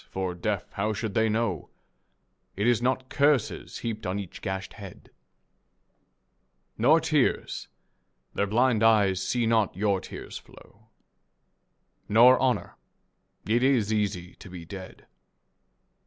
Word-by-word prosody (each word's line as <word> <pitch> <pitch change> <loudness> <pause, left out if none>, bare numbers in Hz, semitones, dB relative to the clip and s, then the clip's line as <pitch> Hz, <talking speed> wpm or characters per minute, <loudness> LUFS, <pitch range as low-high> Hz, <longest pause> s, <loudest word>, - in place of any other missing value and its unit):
For, 95 -1 -3
deaf, 95 +3 -2
how 105 +2 -1
should 105 -1 -4
they 110 +1 +2
know 110 -7 -1 0.9
It 100 - -1
is 120 -1 +3
not 130 +1 0
curses 140 -4 0
heaped 110 -4 -4
on 95 +2 -2
each 100 -4 -7
gashed 95 0 -4
head? 100 -5 -12 1.6
Nor 145 +9 +4
tears. 150 -5 0 0.7
Their 100 - 0
blind 115 +1 +2
eyes 105 -4 +4
see 120 +4 0
not 110 -4 +1
your 100 -2 +1
tears - - -8
flow. 110 +2 -19 1.2
Nor 120 +4 +7
honour. 130 -2 0 0.7
It 115 +3 +2
is 125 -5 +2
easy 95 -4 -2
to 95 - -12
be 90 -2 -9
dead. 95 +1 -10
110 Hz, 125 wpm, -27 LUFS, 95-120 Hz, 1.6 s, Nor